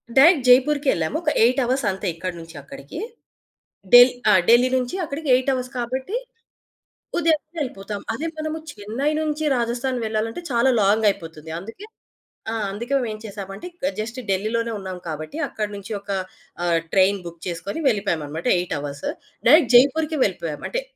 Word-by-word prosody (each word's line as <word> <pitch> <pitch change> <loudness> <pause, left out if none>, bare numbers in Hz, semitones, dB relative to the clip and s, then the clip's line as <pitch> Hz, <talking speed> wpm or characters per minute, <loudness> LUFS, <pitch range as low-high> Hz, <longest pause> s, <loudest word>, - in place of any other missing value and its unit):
Direct 280 -1 +6
జైపూర్‌కే 280 +4 +4
యెళ్ళాము. 165 - -1
ఒక 310 - +2
8 250 +4 +3
hours 255 0 0
అంతే 190 +1 -4
ఇక్కడ 185 +2 -4
నుంచి 165 0 -11
అక్కడికీ. 140 - -9 0.9
ఢె‌ల్ 245 +1 +10 0.2
ఆ! - - +6 0.2
ఢిల్లీ 245 +2 +6
నుంచీ 250 +6 -2
అక్కడికి 300 0 -5
8 260 +2 0
అవర్స్ 255 0 -3
కాబట్టీ, 260 - -3 1.0
ఉదయమే 315 -2 +1
వెళ్ళిపోతాం. 205 -7 -4
అదే 310 +8 -3
మనము 310 0 -3
చెన్నై 225 +8 -2
నుంచి 310 0 -2
రాజస్థాన్ 240 +2 -1
వెళ్ళాలంటే 220 +6 -2
చాలా 240 +2 +3
లాంగయిపోతుంది. 195 -7 0
అందుకే 225 - -10 0.7
ఆ! - - -2 0.2
అందుకే 235 +7 -4
మేమేం 220 -4 -3
చేశామంటే, 200 - -8
ఇక 305 -5 -2
జస్ట్ 225 +4 -4
ఢిల్లీ‌లోనే 220 +4 0
ఉన్నాం 190 -2 -6
కాబట్టి, 155 - -6
అక్కడి 210 -1 -4
నుంచి 200 +2 -9
ఒకా 200 -1 -3 0.5
ఆహ్, 170 -1 +2
ట్రైన్ 195 +1 +4
బుక్ 170 -1 -11
చేసుకొని 180 - -4
వెళ్ళిపోయామనమాట 170 - -2
8 180 - -3
అవర్స్. 140 0 -5 0.4
డైరెక్ట్ 270 -2 +6
జైపూర్‌కే 300 +5 +4
వెళ్ళిపోయాం. 165 -6 -4
అంటే, - - -1
230 Hz, 150 wpm, -22 LUFS, 195-270 Hz, 1.0 s, ఢె‌ల్